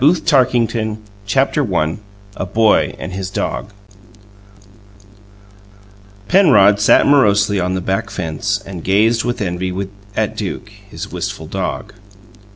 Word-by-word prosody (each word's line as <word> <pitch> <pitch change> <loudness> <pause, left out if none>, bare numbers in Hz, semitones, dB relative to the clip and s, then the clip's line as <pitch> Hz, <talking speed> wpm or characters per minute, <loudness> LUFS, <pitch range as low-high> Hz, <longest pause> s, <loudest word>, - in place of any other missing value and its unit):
Over 160 +4 +5
the - - -17 0.3
Fence 110 -2 -1 0.3
CHAPTER 135 -2 +1
I 80 +4 0 0.4
A 95 - -4
BOY 110 +3 +2
AND 90 - -7
HIS 95 0 -4
DOG 95 - -3 2.6
Penrod 125 - +5
sat 105 - +5
morosely 105 -7 +3
upon 90 +1 -1
the 95 - -2
back 95 +5 -2
fence 90 +4 -2
and 90 -4 -8
gazed 110 +4 +2
with 120 -1 -3
envy 90 0 -3 0.4
at - - -1
Duke, - - -5 0.2
his - - -8
wistful - - -5
dog. - - -4
105 Hz, 125 wpm, -17 LUFS, 95-115 Hz, 2.6 s, Over